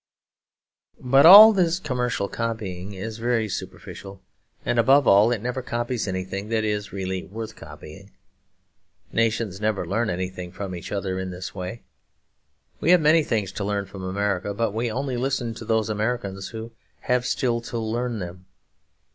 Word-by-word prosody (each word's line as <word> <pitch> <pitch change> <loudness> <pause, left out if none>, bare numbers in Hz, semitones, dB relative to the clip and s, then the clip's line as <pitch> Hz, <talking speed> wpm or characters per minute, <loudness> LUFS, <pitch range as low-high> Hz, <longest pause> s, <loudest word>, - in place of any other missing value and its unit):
But 135 +4 +5
all 215 +4 +11
this 175 -4 +2
commercial 125 - -2
copying 100 -5 -4
is 110 +4 -6
very 115 -1 0
superficial; 100 0 -8 0.5
and 120 -1 +1
above 135 +3 +5
all, 105 +4 +6
it 115 -3 -2
never 125 +2 -2
copies 120 -2 -3
anything 95 +2 -4
that 110 -1 0
is 105 -1 -2
really 95 -1 -3
worth 110 +3 -7
copying. 80 +5 -12 1.0
Nations 110 -3 0
never 110 -2 0
learn 115 +3 -1
anything 90 -1 -4
from 95 0 -6
each 85 - -7
other 95 -2 -2
in 95 0 -4
this 90 +1 -7
way. 95 +4 -6 1.0
We - - 0
have 180 0 +7
many 155 +1 +4
things 105 -8 -1
to 100 - -5
learn 100 0 -1
from 95 0 -10
America; 100 +1 -2
but 115 0 0
we 115 +1 -1
only 130 +1 -2
listen 125 -2 -1
to 115 - -9
those 110 -1 +1
Americans 105 -3 -2
who 115 0 -8 0.3
have 125 -1 +1
still 120 -2 0
to 120 - -6
learn 115 +1 -2
them. 90 -1 -8
110 Hz, 160 wpm, -24 LUFS, 95-120 Hz, 1.0 s, all